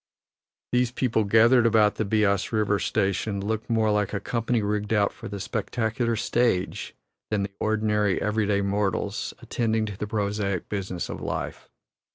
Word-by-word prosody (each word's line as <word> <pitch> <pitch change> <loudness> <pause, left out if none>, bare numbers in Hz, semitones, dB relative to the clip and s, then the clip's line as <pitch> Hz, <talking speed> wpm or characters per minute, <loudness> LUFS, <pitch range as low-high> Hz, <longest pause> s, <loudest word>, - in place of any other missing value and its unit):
These 125 0 +2
people 115 -4 +1
gathered 115 +3 +5
about 110 -2 +4
the 110 - 0
Beas 100 -2 +1
River 105 -2 +1
station 100 +1 0
look 110 +3 -3
more 110 -2 +2
like 105 -1 0
a - - 0
company 115 0 -1
rigged 105 0 -1
out 105 -2 +2
for - - -9
the 100 0 -6
spectacular 115 +3 -1
stage 115 -4 0 0.3
than 100 -2 0
ordinary, 105 -2 +1
everyday 105 -1 +1
mortals 100 0 -1
attending 110 -2 0
to 105 -3 -6
the 105 - -4
prosaic 100 -3 -1
business 95 -3 -3
of - - -6
life. - - -4
105 Hz, 150 wpm, -26 LUFS, 100-110 Hz, 0.3 s, gathered